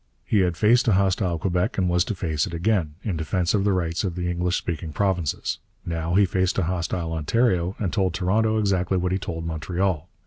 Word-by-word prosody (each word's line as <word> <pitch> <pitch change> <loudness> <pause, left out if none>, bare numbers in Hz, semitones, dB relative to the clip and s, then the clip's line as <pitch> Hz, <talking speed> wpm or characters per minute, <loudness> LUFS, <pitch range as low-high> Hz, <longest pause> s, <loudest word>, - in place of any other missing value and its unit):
He 105 - +2
had 90 -3 +1
faced 120 +4 +4
a 110 - +5
hostile 95 -2 +1
Quebec, 90 +1 -1
and 95 -2 +2
was 90 0 +3
to 110 - -3
face 80 -5 -1
it 85 - -6
again, 85 -4 0
in 95 -7 -2
defence 85 +2 0
of 100 -2 +2
the 100 - +2
rights 85 -2 -1
of 90 -4 -2
the 90 -1 -2
English 90 +1 0
speaking 80 -2 -4
provinces. 90 -6 -1 0.3
Now 85 +1 -2
he 100 +1 +6
faced 95 0 0
a 95 - +2
hostile 85 -1 -2
Ontario, 90 +2 +1
and 95 -5 -2
told 95 -5 +1
Toronto 110 +4 +1
exactly 95 -3 +1
what 90 0 0
he 95 - 0
told 80 -3 -5
Montreal. 85 +1 -2
90 Hz, 210 wpm, -24 LUFS, 85-95 Hz, 0.3 s, he